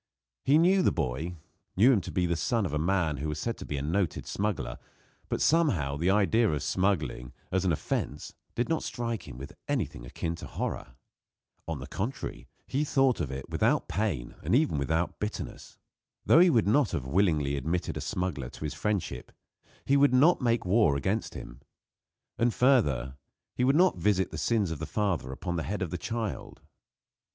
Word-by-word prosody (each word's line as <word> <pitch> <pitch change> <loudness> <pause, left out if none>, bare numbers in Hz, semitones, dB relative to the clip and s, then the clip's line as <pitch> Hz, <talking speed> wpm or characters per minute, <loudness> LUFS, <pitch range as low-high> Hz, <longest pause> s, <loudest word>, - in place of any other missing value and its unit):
He 140 +3 +5
knew 185 +4 +4
the - - +3
boy 80 +3 -2 0.4
knew 120 +7 +6
him 105 - +2
to - - -7
be 90 - +1
the 85 0 0
son 110 +6 0
of 80 - -3
a 75 - 0
man 85 -3 +1
who 75 +3 -3
was 75 - -3
said 115 +8 -2
to - - -9
be 75 - -3
a 70 - -3
noted 85 +2 -1
smuggler; 105 -1 -2 0.5
but, - - 0
somehow, 125 - +2
the 85 +5 0
idea 105 +3 +3
of 75 -3 -1
smuggling, 75 -10 -1 0.2
as 95 0 +1
an 90 - +3
offence, 80 - -3 0.2
did 120 - 0
not 165 -1 0
strike 115 -5 -4
him 60 -4 -9
with 70 +3 -8
anything 95 - -2
akin 80 +7 -4
to - - -8
horror. 65 - -4 0.7
On 80 -2 -2
the 65 - -7
contrary, 105 - -5 0.2
he 140 +3 -1
thought 135 -3 +2
of 75 -6 -2
it 65 0 -6
without - - +1
pain 85 - -2
and - - +1
even 140 - +2
without 80 +5 -1
bitterness. 105 +1 -6 0.5
Though - - +6
he 180 +1 +7
would 115 -10 +3
not 135 +7 +3
have 65 - -2
willingly 75 -3 +2
admitted 80 +6 -2
a - - -4
smuggler 85 -9 -3
to - - -10
his 75 - -3
friendship, 105 -4 -3 0.5
he 140 - +4
would 140 -2 +5
not 155 +7 +5
make 120 -3 +1
war 95 -5 +4
against 95 +10 -2
him. - - -9 0.8
And, 120 +1 +3
further, 75 - +2 0.4
he 125 - -1
would 135 +3 +4
not 180 - +4
visit 95 0 +1
the - - -5
sins 105 -7 +1
of 80 - -4
the 80 - -4
father 95 - -1
upon 85 +6 -4
the - - -1
head 105 -1 -1
of 85 - -4
the 90 - -3
child. 110 -2 -4
95 Hz, 195 wpm, -29 LUFS, 75-115 Hz, 0.8 s, he